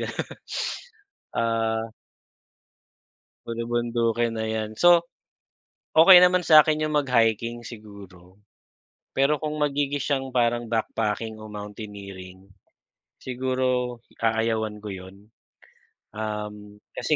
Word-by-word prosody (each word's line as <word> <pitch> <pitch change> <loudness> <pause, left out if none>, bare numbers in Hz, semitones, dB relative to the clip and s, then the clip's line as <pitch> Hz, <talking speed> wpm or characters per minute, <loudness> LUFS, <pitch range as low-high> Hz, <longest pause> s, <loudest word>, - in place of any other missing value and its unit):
gano'n. - - -3 1.1
Ah. 115 0 0 1.6
Bulubundukin 115 0 -1
na 110 - -2
'yan, 110 -1 -3
so. 175 -1 +6 0.9
Okey 175 +3 +9
naman 180 -1 +4
sa'kin 155 -1 +6
yung 155 - -3
mag-hiking 120 -4 +1
siguro, 100 -5 -13 0.8
pero 140 +2 +2
kung 155 -1 -3
magiging 145 -1 0
siyang 135 -2 -1
parang 120 -1 +1
backpacking 110 -1 -2
o 110 - -9
mountaineering, 100 -3 -9 0.7
siguro 130 -1 -1 0.2
aayawan 110 -1 0
ko 105 - -12
yun. 95 +4 -13 0.8
Um, 105 -1 -6 0.2
kasi - - 0
115 Hz, 90 wpm, -25 LUFS, 105-130 Hz, 1.6 s, Okey